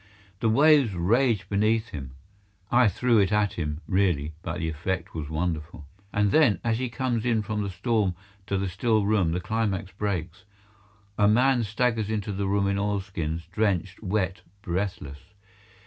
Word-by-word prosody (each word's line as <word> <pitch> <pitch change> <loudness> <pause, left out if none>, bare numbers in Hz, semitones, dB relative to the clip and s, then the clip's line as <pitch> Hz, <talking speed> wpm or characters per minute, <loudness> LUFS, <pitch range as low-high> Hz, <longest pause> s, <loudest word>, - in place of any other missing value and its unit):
The 115 - +1
waves 140 -3 +5
rage 105 +2 +2
beneath 110 +3 +1
him. 65 -3 -8 0.6
(I 120 0 +5
threw 115 +2 +2
it 100 0 +2
at 105 -2 +2
him, 75 -1 -4
really, 90 -6 +1
but 85 -1 -4
the 85 -1 -2
effect 85 +3 -3
was 75 -3 -5
wonderful.) 80 -1 -3 0.3
And 105 -1 +1
then, 130 -5 +4
as 115 0 0
he 130 -1 -2
comes 120 -2 -1
in 115 -3 +1
from 105 0 -2
the 100 - -2
storm 100 0 0 0.3
to 100 - 0
the 95 +1 -1
still 105 +3 +1
room, 100 -6 +2
the 90 - -1
climax 100 -1 -2
breaks. 95 -3 -3 0.8
A 105 - +5
man 125 +4 +4
staggers 110 0 0
into 105 -1 -2
the 100 0 -2
room 100 0 +1
in 100 0 0
oilskins, 95 -6 -2
drenched, 95 -2 -1
wet, 95 -2 -1 0.2
breathless. 85 -6 -3
100 Hz, 165 wpm, -26 LUFS, 90-110 Hz, 0.8 s, waves